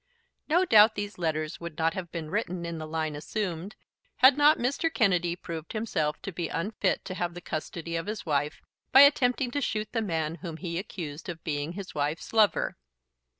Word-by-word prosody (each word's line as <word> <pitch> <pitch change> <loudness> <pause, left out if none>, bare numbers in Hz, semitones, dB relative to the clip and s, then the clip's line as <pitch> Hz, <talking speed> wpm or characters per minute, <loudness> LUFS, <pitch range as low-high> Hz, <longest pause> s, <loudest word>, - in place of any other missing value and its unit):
No 350 +4 +4
doubt 215 - +7
these 205 -2 -5
letters 155 -1 -2
would 170 -3 -7
not 165 0 +1
have 175 -3 -6
been 160 -2 -5
written 185 -4 -2
in 170 -1 -4
the 155 - -6
line 155 -1 -2
assumed 180 +3 -4 0.4
had 260 +1 +7
not 295 +2 +6
Mr. 280 +7 0
Kennedy 180 - +2
proved 165 -2 -7
himself 180 -9 -1
to 195 - -4
be 170 -1 -3
unfit 195 +3 -1
to 185 - -4
have 175 -2 -3
the - - -5
custody 165 0 -5
of 165 +3 -3
his 215 +1 -4
wife 145 -1 -1 0.3
by 270 - +9
attempting 270 -3 +4
to 285 - -1
shoot 215 -4 -2
the 225 - 0
man 165 -5 -2
whom 165 -2 -6
he 170 -1 -3
accused 165 -5 -6
of 165 -2 -7
being 145 +1 -2
his 185 -3 -7
wife's 150 +6 -2
lover. 215 -2 +3
175 Hz, 195 wpm, -28 LUFS, 160-215 Hz, 0.4 s, by